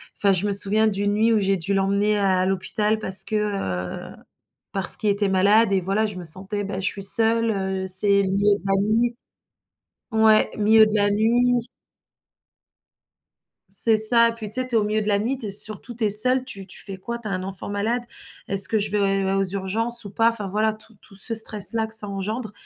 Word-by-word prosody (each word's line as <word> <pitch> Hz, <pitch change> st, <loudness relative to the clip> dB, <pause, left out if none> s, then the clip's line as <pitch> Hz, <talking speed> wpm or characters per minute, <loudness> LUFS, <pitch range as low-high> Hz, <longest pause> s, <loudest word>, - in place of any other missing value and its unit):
enfin, 200 Hz, -, +1 dB
je 190 Hz, +1 st, 0 dB
me 205 Hz, -, -2 dB
souviens 205 Hz, +2 st, +5 dB
d'une 205 Hz, -1 st, -1 dB
nuit 225 Hz, +2 st, +1 dB
où 220 Hz, -, +1 dB
j'ai 195 Hz, -1 st, -1 dB
dû 185 Hz, +3 st, -4 dB
l'emmener 200 Hz, +2 st, -1 dB
à 190 Hz, -2 st, 0 dB
l'hôpital 210 Hz, +3 st, -2 dB
parce 190 Hz, -2 st, +3 dB
que, -, -, -11 dB
heu, 95 Hz, -, -5 dB, 0.6 s
parce 195 Hz, -2 st, 0 dB
qu'il 210 Hz, -2 st, -1 dB
était 200 Hz, 0 st, -2 dB
malade 200 Hz, +3 st, +2 dB
et 195 Hz, -1 st, 0 dB
voilà, 200 Hz, +4 st, -2 dB
je 210 Hz, -, -9 dB
me 180 Hz, -, -9 dB
sentais, 190 Hz, +5 st, -2 dB
bah, 195 Hz, -1 st, -6 dB
je 190 Hz, -, -3 dB
suis 195 Hz, -, -5 dB
seule, 225 Hz, +2 st, +3 dB
heu, 190 Hz, -2 st, -4 dB
c'est 200 Hz, +2 st, 0 dB
le 190 Hz, -, -3 dB
milieu 200 Hz, +1 st, +1 dB
de -, -, -19 dB
la 195 Hz, -, -1 dB
nuit. 230 Hz, +3 st, -1 dB, 1.0 s
Ouais, 220 Hz, -1 st, +2 dB
milieu 220 Hz, +1 st, +4 dB
de 215 Hz, -, -4 dB
la 205 Hz, 0 st, +1 dB
nuit. 240 Hz, +3 st, 0 dB, 2.0 s
C'est 225 Hz, -1 st, +1 dB
ça 230 Hz, +2 st, +6 dB
et -, -, -4 dB
puis 220 Hz, -2 st, -9 dB
tu 210 Hz, -, +1 dB
sais, 255 Hz, 0 st, -3 dB
tu 255 Hz, -, -3 dB
es -, -, +3 dB
au 210 Hz, -, -1 dB
milieu 215 Hz, +1 st, -2 dB
de 210 Hz, -, -5 dB
la 200 Hz, -1 st, +1 dB
nuit, 245 Hz, +6 st, -4 dB
tu 235 Hz, -, -6 dB
es, -, -, -5 dB
surtout 215 Hz, +4 st, +4 dB
tu 230 Hz, 0 st, -3 dB
es 210 Hz, -, 0 dB
seule, 250 Hz, +5 st, +8 dB
tu 195 Hz, -7 st, -9 dB
tu 185 Hz, -, -9 dB
fais 195 Hz, -2 st, -7 dB
quoi? 235 Hz, +5 st, -7 dB
Tu 230 Hz, -2 st, -9 dB
as -, -, -6 dB
un 185 Hz, -1 st, -4 dB
enfant 190 Hz, +1 st, -6 dB
malade? 220 Hz, +4 st, -3 dB, 0.4 s
Est-ce 195 Hz, 0 st, +5 dB
que 220 Hz, -, -1 dB
je 205 Hz, 0 st, -3 dB
vais, 210 Hz, -, -2 dB
heu, 195 Hz, -1 st, -1 dB
aux 195 Hz, -, 0 dB
urgences 210 Hz, +5 st, 0 dB
ou 200 Hz, -, -9 dB
pas? 225 Hz, +3 st, +1 dB
Enfin 220 Hz, -4 st, -5 dB
voilà, 215 Hz, +3 st, -2 dB
tout 220 Hz, +1 st, -18 dB
tout 200 Hz, -, -17 dB
ce 205 Hz, +4 st, -5 dB
stress 220 Hz, -2 st, 0 dB
là 225 Hz, -1 st, -2 dB
que 220 Hz, -, -1 dB
ça 220 Hz, -2 st, +1 dB
engendre. 210 Hz, +3 st, -6 dB
205 Hz, 230 wpm, -21 LUFS, 195-220 Hz, 2.0 s, seule